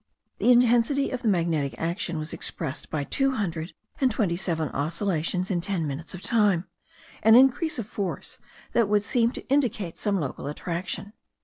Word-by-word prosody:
The 250 Hz, -, +5 dB
intensity 245 Hz, +3 st, +4 dB
of 255 Hz, -, -3 dB
the -, -, -1 dB
magnetic 165 Hz, -7 st, +1 dB
action 170 Hz, 0 st, -2 dB
was 155 Hz, 0 st, -4 dB
expressed 135 Hz, -, -4 dB
by 150 Hz, -2 st, -2 dB
two 270 Hz, -, +1 dB
hundred 175 Hz, -7 st, -3 dB, 0.3 s
and 265 Hz, -, +4 dB
twenty 205 Hz, -6 st, 0 dB
seven 165 Hz, -4 st, -2 dB
oscillations 170 Hz, +3 st, -1 dB
in 175 Hz, -2 st, 0 dB
ten 185 Hz, -3 st, -1 dB
minutes 150 Hz, +5 st, -5 dB
of 185 Hz, -, -9 dB
time; 205 Hz, -7 st, +2 dB, 0.6 s
an 220 Hz, 0 st, +7 dB
increase 270 Hz, +5 st, +4 dB
of 230 Hz, -, -3 dB
force 200 Hz, -2 st, -5 dB, 0.3 s
that 230 Hz, -4 st, +3 dB
would 205 Hz, -1 st, +3 dB
seem 235 Hz, +2 st, +2 dB
to -, -, -8 dB
indicate 240 Hz, -, 0 dB
some 200 Hz, -2 st, +1 dB
local 140 Hz, -2 st, -4 dB
attraction. 175 Hz, +6 st, -4 dB
195 Hz, 170 wpm, -26 LUFS, 165-235 Hz, 0.6 s, an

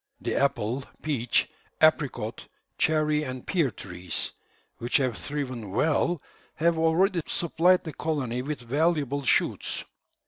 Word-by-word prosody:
The -, -, -2 dB
apple, 135 Hz, -2 st, +1 dB, 0.2 s
peach, 130 Hz, -6 st, +2 dB, 0.3 s
apricot, -, -, +2 dB, 0.3 s
cherry, 155 Hz, -1 st, +3 dB
and 130 Hz, -3 st, -5 dB
pear 165 Hz, -8 st, +2 dB
trees, 90 Hz, -4 st, -4 dB, 0.5 s
which 120 Hz, +1 st, +2 dB
have 130 Hz, -5 st, 0 dB
thriven 130 Hz, -5 st, -4 dB
well, 150 Hz, -, +1 dB, 0.3 s
have 170 Hz, +1 st, +2 dB
already 170 Hz, +3 st, +3 dB
supplied 175 Hz, +2 st, +3 dB
the 160 Hz, -, -6 dB
colony 135 Hz, -6 st, -2 dB
with 145 Hz, +1 st, -4 dB
valuable 145 Hz, +2 st, +1 dB
shoots. 135 Hz, -, +1 dB
145 Hz, 115 wpm, -27 LUFS, 125-160 Hz, 0.5 s, cherry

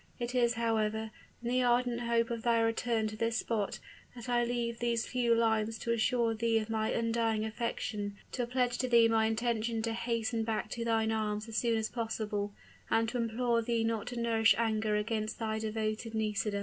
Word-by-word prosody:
It 240 Hz, 0 st, -3 dB
is, 240 Hz, -1 st, +3 dB
however, 220 Hz, -1 st, 0 dB, 0.3 s
in 235 Hz, -, -2 dB
the 255 Hz, +1 st, +2 dB
ardent 245 Hz, -1 st, +2 dB
hope 235 Hz, -1 st, +1 dB
of 230 Hz, -1 st, -3 dB
thy 235 Hz, 0 st, +3 dB
return 225 Hz, 0 st, +1 dB
to 215 Hz, -, -7 dB
this 230 Hz, +1 st, 0 dB
spot, 215 Hz, -5 st, -1 dB, 0.4 s
that 240 Hz, -1 st, -9 dB
I 240 Hz, -1 st, +2 dB
leave 235 Hz, -1 st, -2 dB
these 235 Hz, -1 st, 0 dB
few 240 Hz, -2 st, +2 dB
lines 225 Hz, -1 st, +1 dB
to 235 Hz, -, -2 dB
assure 235 Hz, 0 st, +2 dB
thee 225 Hz, 0 st, +1 dB
of 220 Hz, 0 st, -2 dB
my 220 Hz, -1 st, 0 dB
undying 230 Hz, -1 st, 0 dB
affection, 215 Hz, -2 st, -3 dB
to 245 Hz, -2 st, -2 dB
pledge 245 Hz, -1 st, 0 dB
to 255 Hz, -, 0 dB
thee 235 Hz, -1 st, +6 dB
my 225 Hz, -1 st, +3 dB
intention 225 Hz, 0 st, -1 dB
to 225 Hz, 0 st, -1 dB
hasten 230 Hz, -1 st, -1 dB
back 220 Hz, -1 st, -2 dB
to 235 Hz, -, -3 dB
thine 225 Hz, -1 st, +1 dB
arms 215 Hz, 0 st, -1 dB
as 225 Hz, -1 st, -4 dB
soon 230 Hz, -1 st, +2 dB
as 220 Hz, 0 st, 0 dB
possible, 215 Hz, -3 st, -3 dB, 0.4 s
and 225 Hz, 0 st, +2 dB
to 250 Hz, -, -3 dB
implore 235 Hz, +1 st, +1 dB
thee 230 Hz, 0 st, 0 dB
not 225 Hz, -2 st, -1 dB
to 245 Hz, -1 st, -4 dB
nourish 225 Hz, -1 st, +4 dB
anger 220 Hz, -2 st, +1 dB
against 215 Hz, 0 st, -1 dB
thy 220 Hz, -1 st, -2 dB
devoted 220 Hz, +1 st, -3 dB
NISIDA." 210 Hz, -1 st, 0 dB
225 Hz, 195 wpm, -32 LUFS, 220-235 Hz, 0.4 s, thee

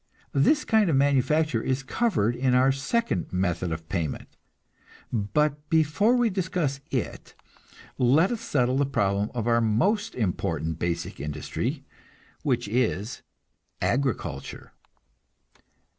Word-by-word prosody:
This 285 Hz, -, +3 dB
kind 220 Hz, -4 st, +3 dB
of 155 Hz, -, +2 dB
manufacture 140 Hz, -1 st, +2 dB
is 130 Hz, +2 st, -1 dB
covered 135 Hz, -, +1 dB
in 125 Hz, 0 st, +2 dB
our 130 Hz, +1 st, +5 dB
second 135 Hz, -, -1 dB
method 90 Hz, -2 st, -1 dB
of 80 Hz, 0 st, -5 dB
payment; 80 Hz, -4 st, -4 dB, 0.8 s
but 145 Hz, +8 st, 0 dB
before 160 Hz, +9 st, +3 dB
we 240 Hz, -3 st, +2 dB
discuss 180 Hz, -7 st, -1 dB
it, 125 Hz, -5 st, -4 dB, 0.6 s
let 145 Hz, -, +4 dB
us 235 Hz, -2 st, -3 dB
settle 130 Hz, -, +1 dB
the 140 Hz, -1 st, +2 dB
problem 100 Hz, -5 st, 0 dB
of 115 Hz, -3 st, -2 dB
our 115 Hz, 0 st, +3 dB
most 200 Hz, -, +1 dB
important 80 Hz, -, -2 dB
basic 85 Hz, -1 st, -3 dB
industry, 75 Hz, +1 st, -3 dB, 0.6 s
which 125 Hz, -5 st, 0 dB
is 115 Hz, -1 st, -1 dB, 0.6 s
agriculture. 120 Hz, -, -2 dB
130 Hz, 115 wpm, -26 LUFS, 100-155 Hz, 0.8 s, our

